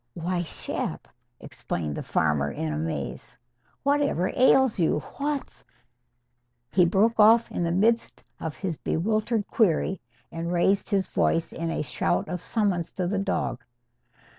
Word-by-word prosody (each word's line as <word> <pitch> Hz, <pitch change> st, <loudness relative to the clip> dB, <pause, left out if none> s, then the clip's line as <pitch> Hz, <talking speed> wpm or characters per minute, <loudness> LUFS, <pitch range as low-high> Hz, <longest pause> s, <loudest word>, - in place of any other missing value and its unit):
"Why, 175 Hz, +1 st, -1 dB
Shep," 165 Hz, -, -4 dB, 0.3 s
exclaimed 75 Hz, -4 st, -4 dB
the -, -, -4 dB
farmer 75 Hz, -2 st, +1 dB
in 75 Hz, +2 st, -3 dB
amaze, 75 Hz, -2 st, -4 dB, 0.5 s
"whatever 280 Hz, -, +1 dB
ails 260 Hz, -3 st, +4 dB
you? 160 Hz, -2 st, +2 dB, 0.2 s
What's 285 Hz, 0 st, -3 dB, 0.5 s
" 120 Hz, 0 st, -49 dB
He 180 Hz, -2 st, +5 dB
broke 215 Hz, +6 st, +2 dB
off 225 Hz, +2 st, +6 dB
in -, -, -3 dB
the 170 Hz, -1 st, 0 dB
midst 225 Hz, +6 st, +1 dB, 0.2 s
of 160 Hz, -2 st, -5 dB
his 180 Hz, -6 st, -3 dB
bewildered 215 Hz, +4 st, 0 dB
query 190 Hz, -2 st, +1 dB, 0.3 s
and 165 Hz, +1 st, -4 dB
raised 190 Hz, +3 st, +2 dB
his 195 Hz, -2 st, +1 dB
voice 165 Hz, 0 st, 0 dB
in 165 Hz, 0 st, -3 dB
a 165 Hz, -, -1 dB
shout 140 Hz, -, -1 dB
of 180 Hz, -1 st, -4 dB
summons 190 Hz, -7 st, 0 dB
to 185 Hz, -, -2 dB
the 195 Hz, +3 st, -1 dB
dog. 195 Hz, -10 st, -2 dB
180 Hz, 140 wpm, -26 LUFS, 155-215 Hz, 0.5 s, off